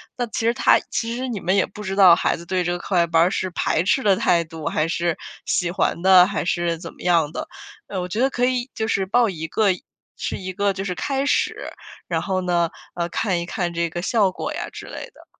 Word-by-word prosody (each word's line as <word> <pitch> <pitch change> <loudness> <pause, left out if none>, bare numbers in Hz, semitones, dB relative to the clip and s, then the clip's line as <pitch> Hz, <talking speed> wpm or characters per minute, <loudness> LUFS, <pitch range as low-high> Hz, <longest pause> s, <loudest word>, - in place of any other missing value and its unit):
那 245 -1 -2
其 220 - -4
实 230 - +3
他 - - +4
其 230 +1 -2
实 260 +1 -3
你 230 -5 -3
们 185 +2 +1
也 - - +3
不 210 - -11
知 195 -1 -3
道 185 -4 +8
孩 170 - 0
子 170 - -11
对 185 +1 0
这 175 - -1
个 175 - -1
课 190 - -6
外 170 -1 +4
班 165 0 +4
儿 180 - +2
是 185 - -1
排 165 - 0
斥 235 +8 +1
的 200 -2 +4
态 175 -4 +2
度， 160 -2 -7
还 155 - 0
是 170 0 -1 0.3
喜 175 -1 0
欢 170 -1 -1
的 185 -1 +7
还 200 -3 -2
是 175 -1 0
怎 165 0 -9
么 - - -17
样 165 -4 +2
的。 - - -5 0.4
呃， 190 - -4
我 180 - -3
觉 210 +5 -4
得 265 +2 +3
可 245 -2 0
以 250 0 -1
就 220 - -2
是 195 -3 0
报 235 +4 +3
1 160 -5 -4
个， 205 +5 +2 0.5
是 - - -3
一 185 0 -6
个 200 +2 +1
就 195 0 -5
是 180 - -2
开 270 +8 -2
始， - - +1 0.5
然 - - -1
后 190 -1 -1
呢， 175 -2 +1 0.2
呃， 170 0 -2
看 180 -2 -1
一 170 - -6
看 175 -2 -2
这 170 0 -1
个 175 +2 -5
效 200 -3 +2
果 290 +10 -5
呀 345 +3 -4
之 - - -9
类 - - -7
的。 - - -18
185 Hz, 275 characters per minute, -22 LUFS, 170-210 Hz, 0.5 s, 道